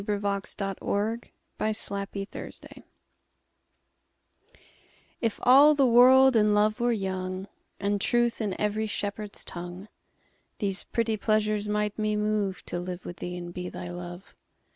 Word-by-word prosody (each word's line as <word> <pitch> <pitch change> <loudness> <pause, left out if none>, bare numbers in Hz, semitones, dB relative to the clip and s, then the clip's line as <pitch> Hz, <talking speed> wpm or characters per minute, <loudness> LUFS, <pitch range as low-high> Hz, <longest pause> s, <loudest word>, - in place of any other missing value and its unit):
Her 210 - +1
Reply 200 -1 -1 0.4
(Written 220 +3 -1 0.4
by 215 0 +1
Sir 210 - -3 0.2
Walter 195 0 -5 0.3
Raleigh) - - -13 2.4
IF 230 -3 -1
all 280 +4 +7
the 275 -2 +4
world 255 +2 +7
and 210 -1 +4
love 215 +2 +2
were 240 0 +2
young, 190 -2 -3 0.3
And 200 0 0
truth 240 0 +2
in 200 -4 -2
every 210 +1 0
shepherd's 205 0 -4
tongue, 175 +3 -7 0.7
These 195 -3 -1
pretty 230 -2 -1
pleasures 215 0 +1
might 210 0 -1
me 215 0 +1
moveTo 205 -4 -1
live 180 0 -6
with 175 - -7
thee 180 0 -5
and 175 0 -7
be 180 0 -5
thy 175 - -7
Love. 175 +1 -8
210 Hz, 140 wpm, -27 LUFS, 190-220 Hz, 2.4 s, all